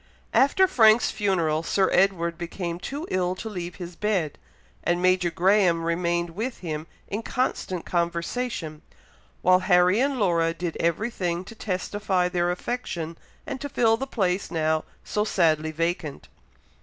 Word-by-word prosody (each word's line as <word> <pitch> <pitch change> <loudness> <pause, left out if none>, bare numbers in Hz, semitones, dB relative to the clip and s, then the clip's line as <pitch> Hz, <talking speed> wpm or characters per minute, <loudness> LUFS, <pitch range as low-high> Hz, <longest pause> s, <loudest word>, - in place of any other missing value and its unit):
After 330 +8 +5
Frank's 220 -8 +5
funeral, 170 -7 +1
Sir 190 +3 +2
Edward 175 -3 +2
became 170 0 -4
too 285 - -5
ill 180 0 0
to 205 +4 -7
leave 180 -5 -5
his 175 -2 -8
bed; 190 -8 -1 0.4
and 175 0 +1
Major 185 -1 +3
Graham 180 -1 +3
remained 170 0 0
with 225 +8 -4
him 155 -2 -4 0.2
in 205 +3 -3
constant 205 -8 -2
conversation; 170 0 -2 0.6
while 185 0 +6
Harry 180 +2 +4
and 275 +1 +1
Laura 165 -4 +2
did 170 -1 -4
every 170 +8 0
thing 175 -3 -2
to 230 - -10
testify 195 -2 -1
their 175 -1 0
affection, 175 -4 -3 0.3
and 265 - -5
to 285 - -4
fill 230 -5 +3
the 270 +4 -4
place 190 -6 0
now 160 -1 0 0.2
so 210 - -1
sadly 160 -6 +2
vacant. 165 -2 -3
180 Hz, 145 wpm, -25 LUFS, 170-210 Hz, 0.6 s, while